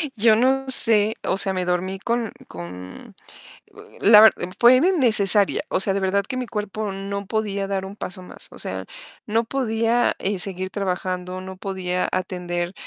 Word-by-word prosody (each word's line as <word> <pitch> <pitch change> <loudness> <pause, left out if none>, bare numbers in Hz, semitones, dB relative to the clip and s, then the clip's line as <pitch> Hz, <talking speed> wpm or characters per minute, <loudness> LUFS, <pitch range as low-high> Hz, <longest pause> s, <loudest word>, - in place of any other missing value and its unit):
yo 220 0 +3
no 265 +3 0
sé, 220 -4 +7
o 190 - -2
sea, 195 -1 +3
me 185 -1 -3
dormí 185 +2 -3
con 235 0 -3 0.2
con 90 +1 -11 0.8
la 210 0 +6
ver 220 -1 +7 0.3
fue 245 +2 +6
innecesaria. 230 - +4
O - - -1
sea, 195 0 -1
de 200 - -2
verdad 195 +1 -1
que 255 - -5
mi 250 -1 -5
cuerpo 210 -1 -5
no 200 +1 -6
podía 200 -2 -3
dar 195 -1 -4
un 195 +1 -10
paso 185 -2 -5
más. - - -9
O - - -10
sea, - - 0 0.4
no 225 +2 -1
podía, 230 -1 -1
eh, 195 0 -3
seguir 185 0 -3
trabajando, 185 -1 -5
no 190 0 -10
podía 185 -2 -4
atender, 175 -1 -4
200 Hz, 170 wpm, -21 LUFS, 185-220 Hz, 0.8 s, sé